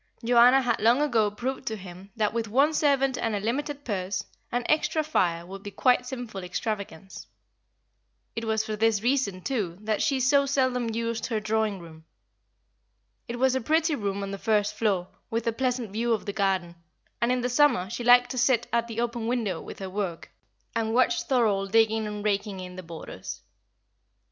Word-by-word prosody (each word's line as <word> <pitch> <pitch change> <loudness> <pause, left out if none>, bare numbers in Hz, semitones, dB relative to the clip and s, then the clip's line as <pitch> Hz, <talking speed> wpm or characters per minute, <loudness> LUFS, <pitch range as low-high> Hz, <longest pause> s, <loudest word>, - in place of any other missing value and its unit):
Joanna 245 +3 +6
had 240 -2 +1
long 235 +4 +5
ago 235 -8 +2
proved 245 +6 -4
to 220 - -1
him 185 -1 -11
that 210 -2 0
with 230 -1 -1
one 275 +8 +3
servant 275 -3 +2
and 225 -2 -1
a - - -1
limited 285 +7 -3
purse, 195 -2 -2 0.3
an 245 0 0
extra 310 0 +2
fire 170 - 0
would 195 +2 -9
be 205 - -7
quite 250 +5 +3
a - - -17
sinful 245 -7 -6
extravagance. 195 -1 -5 1.1
It 230 - -3
was 220 0 0
for 215 - -3
this 220 -1 +2
reason 240 -7 +1
too 205 -11 -2
that 215 0 -1
she 275 -2 +1
so 280 +2 +3
seldom 255 -3 +1
used 230 0 -2
her 225 -3 -1
drawing 215 -1 0
room. 160 -2 -13 1.2
It 240 - -4
was 260 +1 +3
a 260 - 0
pretty 315 +5 +2
room 200 -6 -2
on 195 - -4
the 200 - -5
first 210 -1 +1
floor, 200 -5 0 0.2
with 230 +1 -2
a 230 - +1
pleasant 250 -3 -1
view 230 +3 0
of 220 - -2
the 200 - -3
garden, 190 -4 0 0.4
and 235 +1 +2
in 250 -1 +1
summer 250 -7 +3
she 240 - -4
liked 245 +1 +6
to 255 - -2
sit 245 -1 +3
at 235 0 +1
the 230 -1 -5
open 235 -1 -2
window 225 -8 -1
with - - -9
her 190 - -5
work, 190 -4 -4 0.4
and 225 0 0
watch 295 +7 +3
Thorold 205 -7 +1
digging 220 -1 +3
and 210 0 -5
raking 200 -1 -1
in 180 0 -8
the 185 - -6
borders. 165 -2 -8
225 Hz, 190 wpm, -27 LUFS, 200-250 Hz, 1.2 s, Joanna